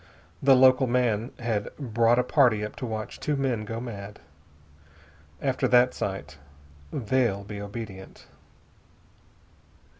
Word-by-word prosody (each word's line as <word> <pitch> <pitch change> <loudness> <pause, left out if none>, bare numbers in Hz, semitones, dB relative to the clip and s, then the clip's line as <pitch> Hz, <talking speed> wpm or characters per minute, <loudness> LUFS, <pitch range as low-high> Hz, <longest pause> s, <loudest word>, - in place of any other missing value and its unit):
The 135 -1 +6
local 130 +1 +5
man 120 -2 +1
had 115 -4 -2
brought 115 -3 +2
a 125 - +3
party 120 -6 +3
up 105 - -8
to 125 - -4
watch 110 -1 -5
two 150 - -1
men 130 -6 -1
go 115 +2 -5
mad. 105 -4 -8 1.2
After 135 -2 0
that 125 0 +4
sight 95 -6 -5 0.5
they'll 115 -5 0
be 100 0 -7
obedient." 100 -2 -8
115 Hz, 120 wpm, -26 LUFS, 105-125 Hz, 1.2 s, The